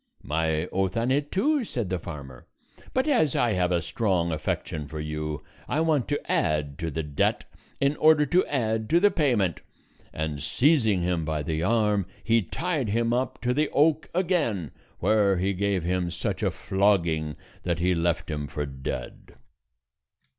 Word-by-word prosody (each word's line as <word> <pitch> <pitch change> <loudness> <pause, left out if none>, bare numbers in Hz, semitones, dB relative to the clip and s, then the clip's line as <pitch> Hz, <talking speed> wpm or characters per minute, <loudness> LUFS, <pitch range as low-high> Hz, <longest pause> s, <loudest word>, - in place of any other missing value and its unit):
"My 80 +1 0
oath 95 +2 -1
on 120 +3 +1
it 145 +2 0
too," 285 +8 +2
said 120 - -3
the 90 - 0
farmer; 70 -7 -9 0.4
"but 260 +3 0
as 235 - +3
I 120 -2 +2
have 90 -2 +1
a 85 -2 +1
strong 90 -4 0
affection 75 -1 -3
for 75 +2 -6
you, 75 0 -4 0.2
I 150 - 0
want 155 -9 +1
to - - 0
add 75 -2 0
to 80 - -2
the 80 +2 -3
debt 75 -2 0 0.4
in 140 +2 +2
order 155 -1 +5
to 175 +6 +3
add 110 -5 -1
to 170 - +5
the 205 +2 +5
payment;" 120 - +1 0.5
and 75 -2 -3
seizing 110 - +3
him 85 -2 0
by 75 -1 -2
the 80 +2 -2
arm, 105 -1 +2 0.2
he 115 0 +3
tied 150 - -2
him 115 +2 +1
up 125 +2 -1
to 125 0 +1
the 150 +2 +1
oak 155 +1 +2
again, 160 - 0 0.3
where 100 -3 +3
he 95 +2 0
gave 100 -2 0
him 90 0 0
such 85 0 -3
a - - +2
flogging 85 -6 +1 0.2
that 85 -2 -1
he 90 +2 +2
left 85 -1 0
him 75 -1 -3
for 75 +2 -3
dead. 65 -1 -6
95 Hz, 170 wpm, -26 LUFS, 80-130 Hz, 0.5 s, order